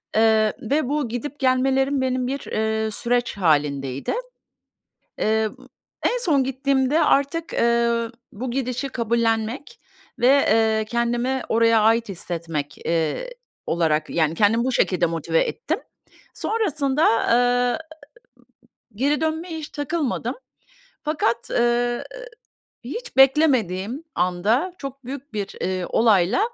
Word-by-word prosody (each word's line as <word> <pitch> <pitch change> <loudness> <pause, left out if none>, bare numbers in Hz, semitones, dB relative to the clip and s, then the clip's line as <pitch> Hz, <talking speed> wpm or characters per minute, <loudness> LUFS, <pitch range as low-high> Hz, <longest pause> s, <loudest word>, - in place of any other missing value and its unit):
Eee, 220 -1 +4
ve 275 +3 0
bu 290 -5 -1
gidip 250 +5 -5
gelmelerim 265 +1 +2
benim 255 -1 0
bir, 275 +2 -2
eee, 220 0 0
süreç 240 0 -1
hâlindeydi. 140 -6 0 1.1
Eee, 220 0 +1 0.5
en - - +2
son 295 - +2
gittiğimde 270 +2 +1
artık, 280 +4 +1
eee, 235 0 +2 0.2
bu 240 +4 -5
gidişi 255 +1 -2
kabullenmek 230 +1 -1 0.4
ve, 245 - +4
eee, 220 -5 +3
kendimi 240 +3 -1
oraya 230 -1 +4
ait 225 0 +3
hissetmek, 165 -5 -5
eee, 165 - -1 0.4
olarak 155 -2 +1
yani 160 -1 +1
kendimi 225 +4 +3
bu 260 - 0
şekilde 180 -7 +2
motive 165 0 0
ettim. - - -3 0.5
Sonrasında, 305 -10 0 0.2
eee, 245 0 +3 1.2
geri 285 +5 +1
dönmeye 320 +1 -2
hiç 305 - -7
takılmadım. 290 -4 -2 0.7
Fakat, 265 -6 -1
ııı, 240 0 +1 0.8
hiç 465 - -7
beklemediğim 265 - +3
anda, 200 - +1
çok 275 -2 -8
büyük 275 0 -8
bir, 200 -2 -4
eee, 185 -1 -2
olayla, 205 - +3
240 Hz, 110 wpm, -23 LUFS, 215-275 Hz, 1.2 s, Eee